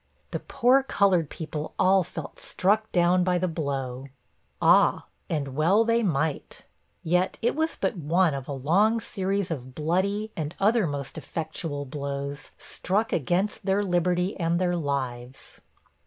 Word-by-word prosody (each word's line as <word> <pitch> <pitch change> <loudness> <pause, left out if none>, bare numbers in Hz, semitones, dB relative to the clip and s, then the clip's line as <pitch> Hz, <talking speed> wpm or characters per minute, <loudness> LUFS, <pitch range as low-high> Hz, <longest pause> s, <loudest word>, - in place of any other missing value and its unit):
The - - -2
poor 255 +3 +3
colored 195 - +2
people 155 -1 -6
all 190 +1 +4
felt 160 -3 -8
struck 215 +3 0
down 180 +1 +3
by 180 0 +2
the 185 +1 0
blow.' 135 -5 -3 0.5
Ah! - - +4 0.2
and 145 -4 -1
well 185 +9 +4
they 230 +1 +2
might. 160 -7 -2 0.4
Yet 180 +3 +1
it 240 - +2
was 320 +1 0
but - - -1
one 170 +1 +2
of 135 -2 -5
a - - -5
long 185 - +2
series 195 -4 -2
of 130 -4 -6
bloody, 195 +7 0
and 155 -3 -4
other 215 -1 +3
most 140 -2 -5
effectual 155 -3 -5
blows, 140 +1 -5
struck 210 +5 -2
against 180 +8 0
their 195 +1 +1
liberty 180 0 +1
and 170 0 +1
their 180 -1 +1
lives. 130 -5 -4
175 Hz, 145 wpm, -26 LUFS, 145-195 Hz, 0.5 s, all